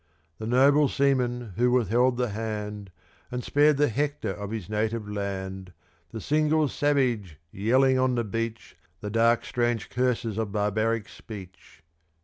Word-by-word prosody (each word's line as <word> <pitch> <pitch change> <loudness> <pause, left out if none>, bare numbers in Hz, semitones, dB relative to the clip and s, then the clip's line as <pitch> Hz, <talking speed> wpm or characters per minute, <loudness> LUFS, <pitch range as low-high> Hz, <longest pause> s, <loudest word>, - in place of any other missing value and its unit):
*8* 80 0 -41
The 110 - -5
noble 140 +4 +5
seaman 125 -6 0
who 125 +1 +3
withheld 125 +1 +2
the 125 -1 0
hand, 105 -1 -5 0.4
And 125 -1 -4
spared 145 +2 +3
the 145 +1 +3
Hector 145 -3 -2
of 100 +2 -6
his 110 -5 -5
native 110 0 -2
land 95 -2 -5 0.4
The 110 - -7
single 155 +4 +2
savage, 125 - 0
yelling 130 +6 +3
on 130 -1 +2
the 120 - 0
beach 115 +2 -4 0.3
The 105 - -5
dark, 115 +1 +3
strange 120 -2 -1
curses 120 -4 0
of 110 -3 -2
barbaric 110 +2 0
speech. 95 -8 -12
115 Hz, 145 wpm, -26 LUFS, 105-125 Hz, 0.4 s, noble